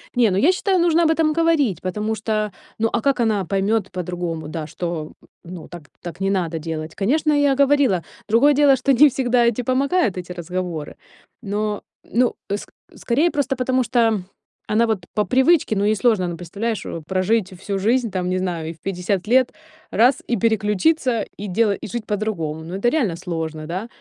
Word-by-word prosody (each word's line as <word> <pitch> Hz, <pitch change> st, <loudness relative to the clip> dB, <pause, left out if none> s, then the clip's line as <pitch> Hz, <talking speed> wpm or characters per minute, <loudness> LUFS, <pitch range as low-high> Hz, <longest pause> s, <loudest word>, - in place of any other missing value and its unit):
Не, 235 Hz, -3 st, +4 dB
ну 185 Hz, -, 0 dB
я 315 Hz, -, +5 dB
считаю: 375 Hz, 0 st, +1 dB
нужно 340 Hz, 0 st, +3 dB
об 320 Hz, -, +4 dB
этом 315 Hz, -1 st, +2 dB
говорить, 310 Hz, -, +2 dB
потому 210 Hz, +4 st, -2 dB
что, 215 Hz, -1 st, -2 dB, 0.3 s
ну 225 Hz, 0 st, +2 dB
а 235 Hz, -, 0 dB
как 275 Hz, 0 st, +1 dB
она 215 Hz, -5 st, +1 dB
поймёт 195 Hz, +2 st, 0 dB
по-другому, 175 Hz, -3 st, -4 dB
да, 155 Hz, -1 st, -5 dB
что 165 Hz, -1 st, -4 dB, 0.3 s
н 175 Hz, -, -9 dB
ну 165 Hz, -3 st, -9 dB
так, 170 Hz, -4 st, -11 dB
так 175 Hz, 0 st, -8 dB
не 195 Hz, -, +1 dB
надо 170 Hz, -4 st, -1 dB
делать? 160 Hz, 0 st, -5 dB
Конечно, 295 Hz, +9 st, +1 dB
я 285 Hz, -2 st, +3 dB
говорила, 275 Hz, -, +3 dB, 0.3 s
другое 275 Hz, +7 st, +5 dB
дело, 280 Hz, -1 st, +5 dB
что 265 Hz, +2 st, +1 dB
не 295 Hz, +5 st, +7 dB
всегда 245 Hz, -2 st, +2 dB
эти 235 Hz, +1 st, +1 dB
помогают 260 Hz, -, +1 dB
эти 180 Hz, 0 st, -6 dB
разговоры, 175 Hz, -2 st, -5 dB, 0.5 s
но 210 Hz, -1 st, -2 dB, 0.3 s
ну 245 Hz, +1 st, +2 dB, 0.2 s
ск -, -, -8 dB, 0.3 s
скорее 295 Hz, +9 st, +1 dB
просто 285 Hz, -3 st, 0 dB
потому, 255 Hz, 0 st, +1 dB
что 225 Hz, -3 st, +2 dB, 0.5 s
она 220 Hz, +2 st, +3 dB
вот 195 Hz, -6 st, -1 dB
по 210 Hz, -, +1 dB
привычке, 265 Hz, -, +3 dB
ну 200 Hz, -, +1 dB
ей 215 Hz, +1 st, +3 dB
сложно, 215 Hz, -3 st, +2 dB
она, 175 Hz, -1 st, -3 dB
представляешь, 200 Hz, +6 st, -4 dB, 0.2 s
прожить 190 Hz, +1 st, 0 dB
всю 195 Hz, 0 st, -3 dB
жизнь, 235 Hz, +3 st, +1 dB
там, 180 Hz, -1 st, -2 dB
не 185 Hz, -, 0 dB
знаю, 175 Hz, -4 st, -3 dB
и 165 Hz, -, -5 dB
в 160 Hz, -, -24 dB
50 190 Hz, 0 st, -2 dB
лет- 255 Hz, +1 st, +3 dB, 0.4 s
раз- 245 Hz, +4 st, +3 dB
и 240 Hz, -, +1 dB
переключиться, 225 Hz, -, +1 dB, 0.2 s
и 205 Hz, -, -5 dB
дела 205 Hz, +2 st, +2 dB
и -, -, -7 dB
жить 235 Hz, 0 st, -5 dB
по-другому. 190 Hz, -8 st, -3 dB
Ну 175 Hz, -, -6 dB
это 220 Hz, +5 st, +2 dB
реально 235 Hz, -, 0 dB
сложно, 160 Hz, -3 st, -5 dB
да? 185 Hz, +7 st, -4 dB
215 Hz, 190 wpm, -21 LUFS, 180-255 Hz, 0.5 s, не